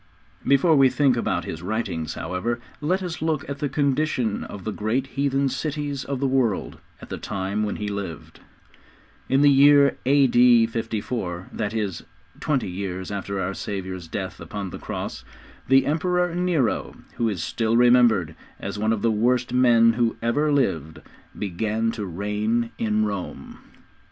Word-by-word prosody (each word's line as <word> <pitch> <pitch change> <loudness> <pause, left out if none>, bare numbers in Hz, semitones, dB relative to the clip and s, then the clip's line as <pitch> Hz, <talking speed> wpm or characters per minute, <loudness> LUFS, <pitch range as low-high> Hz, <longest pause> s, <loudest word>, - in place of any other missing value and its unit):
Before 140 +5 +5
we 135 -2 +6
think 130 0 +2
about 90 -7 -1
his 80 - -6
writings, 90 -6 -3
however, 90 +8 -3 0.2
let 185 +6 0
us 175 -2 -5
look 155 -3 -1
at 140 0 -5
the 145 - -1
condition 140 -5 0
of 100 - -8
the 110 - -3
great 110 +6 -1
heathen 140 0 +1
cities 145 +1 -3
of 140 -2 -4
the 140 - 0
world 130 -6 0 0.2
at - - -11
the - - -5
time 100 +2 -3
when 105 -1 -1
he 105 - -4
lived. 100 -7 -6 0.9
In 135 +1 +3
the 145 - +7
year 140 0 +6
A.D. 125 -4 +5
54, 110 -5 -4
that 110 0 -3
is, 100 -6 -2 0.4
twenty 140 -8 0
years 95 0 -5
after 100 0 -3
our 95 +1 -2
Saviour's 95 -3 -5
death 95 +2 -5
upon 100 -3 -6
the - - -7
cross, - - -5 0.4
the 135 +1 +5
Emperor 180 +3 +1
Nero, 175 -9 0 0.2
who 115 -1 +1
is 90 -6 -3
still 115 0 0
remembered 120 -9 +4 0.3
as 100 +1 -5
one 110 +1 +2
of 110 - -3
the 115 - +3
worst 120 +3 +1
men 120 -2 +5
who 115 -1 0
ever 145 +6 +1
lived, 80 - 0 0.4
began 110 +4 -1
to 105 -3 -5
reign 105 +6 -1
in 110 -1 +1
Rome. 100 -3 -6
115 Hz, 160 wpm, -24 LUFS, 100-135 Hz, 0.9 s, the